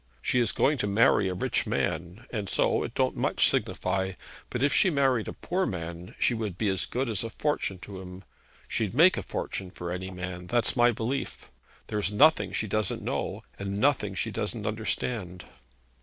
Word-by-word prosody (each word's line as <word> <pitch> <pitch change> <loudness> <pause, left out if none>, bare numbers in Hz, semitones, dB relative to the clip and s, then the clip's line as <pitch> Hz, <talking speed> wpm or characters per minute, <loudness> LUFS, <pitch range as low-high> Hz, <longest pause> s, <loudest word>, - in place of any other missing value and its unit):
She 125 - +1
is 115 -4 +2
going 145 -1 +2
to 105 - 0
marry 100 -1 +4
a 90 - -3
rich - - 0
man, 90 +6 -2
and 105 -5 -3
so - - +2
it - - -5
don't - - +1
much - - +3
signify; 95 0 0 0.4
but 125 - -2
if 145 - +3
she 190 - +5
married 135 -7 +2
a - - -4
poor 185 +1 -1
man, 85 -1 -6
she - - +2
would 110 -6 -3
be 105 -1 +1
as 95 -1 0
good 130 +2 -1
as 110 -2 0
a 115 - -3
fortune 115 -6 -1
to 95 -1 -8
him. 90 0 -10 0.4
She'd 110 -1 -1
make 170 +6 +7
a - - -2
fortune 95 -2 -4
for 85 -1 -6
any 90 +1 -4
man. 90 -1 -6
That's 120 +3 +2
my 120 -1 +5
belief. 120 +4 -3 0.3
There 105 - -2
is 100 -1 +1
nothing 155 +10 +5
she - - -1
doesn't 110 +1 -1
know, - - -2 0.2
and 100 0 -3
nothing 105 -6 +2
she 110 - -1
doesn't 105 +1 -3
understand.' 105 -3 -2
105 Hz, 195 wpm, -28 LUFS, 95-120 Hz, 0.4 s, make